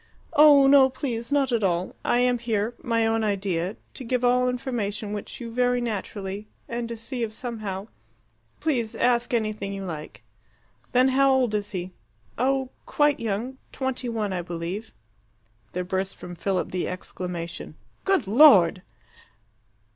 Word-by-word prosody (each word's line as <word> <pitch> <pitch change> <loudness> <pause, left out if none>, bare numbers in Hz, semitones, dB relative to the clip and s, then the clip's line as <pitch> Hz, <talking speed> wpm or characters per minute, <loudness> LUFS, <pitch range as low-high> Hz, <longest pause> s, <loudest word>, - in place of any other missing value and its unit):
"Oh, 290 -2 +8
no, 270 -1 +7
please; 245 -2 -4
not 280 -3 +2
at 230 -3 +1
all. 180 -1 0
I 240 - +2
am 250 -1 +2
here 225 -1 -1
my 230 -2 +1
own 225 0 +1
idea 195 -2 -1 0.2
to 265 - -8
give 250 +1 0
all 250 +1 +3
information 220 -5 -3
which 205 - -6
you 235 -2 -6
very 245 +1 +2
naturally 205 -3 -4 0.2
and 235 0 -4
to 235 - -5
see 240 +3 -5
if 225 -2 -1
somehow 215 -4 -5 0.7
please 245 -8 -1
ask 240 -1 +2
anything 215 -4 -1
you 195 -1 -5
like." 155 -4 -7 0.7
"Then 255 +1 +4
how 270 +1 +4
old 255 -4 +2
is 205 -1 -1
he?" 185 -3 -5 0.5
"Oh, 265 +1 +1 0.2
quite 295 -1 +2
young. 230 +4 -3
Twenty 260 -2 -2
one, 215 -4 -2
I 180 - -1
believe." 175 +5 -5 0.8
There 180 - -2
burst 190 +1 -2
from 175 - -9
Philip 185 +2 -2
the 180 -1 -1
exclamation, 180 -2 -6 0.3
"Good 385 - +2
Lord!" 195 - +7
225 Hz, 150 wpm, -25 LUFS, 195-250 Hz, 0.8 s, Oh